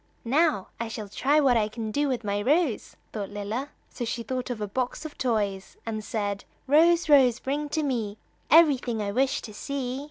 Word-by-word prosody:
"Now, 285 - +2
I 230 - -2
shall 220 -2 -6
try 280 +8 +2
what 270 -4 +4
I 215 -2 +2
can 220 0 -5
do 290 +6 +1
with 250 -3 -2
my 205 0 -1
rose," 285 0 +1 0.2
thought 205 -3 -4
Lilla. 210 +7 -4 0.2
So 245 - -5
she 235 0 -3
thought 255 +1 -3
of 245 -3 -3
a 210 - -3
box 255 +7 -3
of 310 - -7
toys, 205 -6 -2
and 215 -1 -4
said: 205 -2 -3 0.2
"Rose, 330 +5 +4
Rose, 265 -6 +6
bring 290 +3 -3
to 310 +1 -1
me 225 -7 -2 0.3
Everything 275 -8 +5
I 205 -1 -2
wish 265 +5 +1
to 215 - -8
see." 260 +2 -4
245 Hz, 195 wpm, -26 LUFS, 215-280 Hz, 0.3 s, Rose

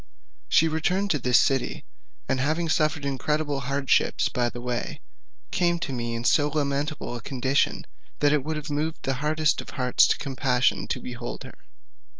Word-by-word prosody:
She 165 - +5
returned 180 +5 0
to 150 - +1
this 125 -1 +4
city, 130 -2 0 0.4
and 130 - 0
having 160 +5 0
suffered 155 -2 +1
incredible 145 +1 -1
hardships 140 +1 +1
by 120 -1 0
the 120 - -8
way, 120 -1 -3 0.5
came 175 -1 +2
to 150 -5 -4
me 120 -1 -3
in 115 - -4
so 145 +4 +4
lamentable 145 -2 -2
a 120 - -6
condition 135 +3 0 0.3
that 145 0 +3
it 150 -3 +1
would 155 +2 -3
have 150 0 -5
moved 155 +3 -2
the 135 - 0
hardest 155 0 +1
heart 125 -2 -4
to - - +6
compassion 130 -2 0
to - - -2
behold 120 -1 -6
her. - - -10
140 Hz, 165 wpm, -26 LUFS, 125-155 Hz, 0.5 s, to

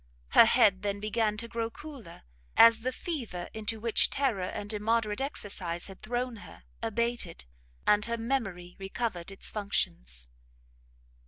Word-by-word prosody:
Her - - +8
head 215 -5 +5
then 200 -1 -1
began 215 0 0
to 235 - -1
grow 230 -1 -2
cooler, 250 - -11 0.3
as 230 0 +8
the 255 +2 -1
fever 240 - -4
into 220 0 -2
which 230 0 +3
terror 260 -8 0
and 205 +3 -4
immoderate 215 +1 0
exercise 195 - -2
had 195 -1 -10
thrown 245 +2 -2
her - - -13 0.2
abated, 230 - -2 0.4
and 210 0 +4
her 235 0 -1
memory 200 -8 -2
recovered 195 -2 -3
its 195 - -3
functions. 60 - -2
215 Hz, 140 wpm, -30 LUFS, 195-235 Hz, 0.4 s, Her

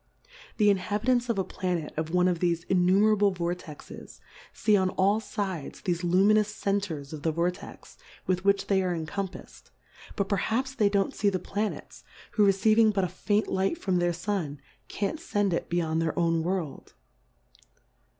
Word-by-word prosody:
The 210 -2 +5
Inhabitants 230 +6 0
of 230 - 0
a 190 - +1
Planet 180 -4 -3
of 160 0 -2
one 180 +1 +3
of 175 -2 0
thefe 170 -1 0
innumerable 200 +3 +4
Vortexes, 175 -4 -6 0.3
fee 215 -2 +2
on 190 -2 +2
all 195 +3 +2
fides 200 -7 -5
thefe 175 -1 -1
luminous 200 +4 +4
Centers 195 -8 -3
of 155 - -7
the 160 - 0
Vortex, 170 +3 -4 0.3
with 185 0 0
which 200 0 +2
they 195 -1 +2
are 180 -2 -1
encompafs'd; 185 +4 -6 0.5
but 200 -2 -1
perhaps 225 +7 -1
they 215 -6 +2
don't 200 -1 0
fee 205 - +2
the 190 - -1
Planets, 205 +4 -4 0.3
who 210 - +2
receiving 215 +3 +4
but 200 -2 0
a - - +1
faint 205 +4 0
Light 190 - 0
from 185 -8 0
their 175 0 +2
Sun, 170 -5 -3 0.3
can't 210 +10 -3
fend 205 - 0
it 170 - -2
beyond 165 -2 0
their 165 +1 -2
own 165 -1 +2
World. 170 -5 -4
190 Hz, 160 wpm, -27 LUFS, 175-205 Hz, 0.5 s, The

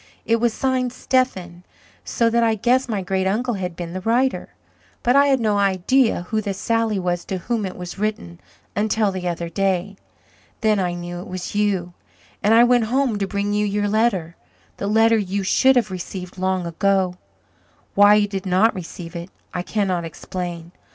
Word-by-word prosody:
It 230 - +3
was 235 0 +1
signed 255 +1 0
'Stephen,' 190 -10 -1 0.4
so 230 - +1
that 235 +1 +3
I 225 -1 +3
guessed 250 +4 +1
my 205 -4 -1
great 190 0 0
uncle 240 +5 0
had 180 -4 -4
been 170 0 -6
the 185 - -4
writer, 245 +5 0 0.5
but 245 +2 +3
I 280 0 +6
had 270 -2 +3
no 210 -3 +1
idea 200 +3 +2
who 220 -1 0
the 200 -2 -3
Sally 225 0 0
was 175 -2 -1
to 190 - -3
whom 215 +2 -2
it 185 - -8
was 180 +1 -7
written, 205 - -3 0.4
until 210 0 +1
the 185 -1 -4
other 170 -1 -3
day. 195 +1 -1 0.6
Then 215 -2 +3
I 180 -2 -1
knew 175 0 -6
it 180 - -8
was 185 -1 -6
you 195 -4 0 0.5
and 215 +3 +4
I 235 - +7
went 245 -1 +4
home 250 -2 0
to 195 - -1
bring 200 +1 -2
you 210 0 +1
your 205 0 0
letter 200 -6 0 0.4
the 200 - -3
letter 225 +1 +4
you 200 0 -2
should 265 +7 +4
have 225 -5 +1
received 185 0 -7
long 185 -1 0
ago. 185 +1 +1 0.8
Why 205 +1 +7
you 210 -1 +3
did 195 -1 -5
not 190 +5 +3
receive 175 -1 -8
it 170 +2 -6 0.2
I 180 - -2
cannot 185 -2 -1
explain. 170 +1 -6
200 Hz, 185 wpm, -21 LUFS, 180-225 Hz, 0.8 s, I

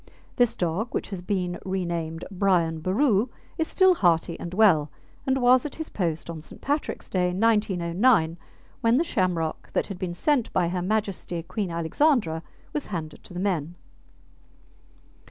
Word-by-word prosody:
This 245 -2 +3
dog, 180 +4 -2
which - - -2
has 190 -3 -4
been 180 -2 -2
renamed 170 -4 -3
Brian 180 -4 +2
Boru, 210 - +2 0.3
is 320 - +1
still 375 -1 +5
hearty 170 - +2
and 170 - -6
well, 180 -7 +4 0.4
and 265 0 +2
was 250 0 +5
at 300 - -5
his 320 -1 -5
post 165 -5 -2
on 165 -2 -6
St. - - -10
Patrick's 290 +2 -2
Day, 180 -1 +1
1909, 190 -3 +2 0.4
when 230 +1 +4
the 320 - +3
shamrock 180 - -1
that - - +1
had 195 -3 -7
been 180 -2 -3
sent 275 - +1
by 175 -2 +2
Her 180 0 -2
Majesty 190 -4 -2
Queen 195 +3 -3
Alexandra 170 - +1 0.3
was 295 - -2
handed 160 -6 -6
to - - -11
the - - -3
men. 175 -4 -1
185 Hz, 155 wpm, -26 LUFS, 170-230 Hz, 0.4 s, still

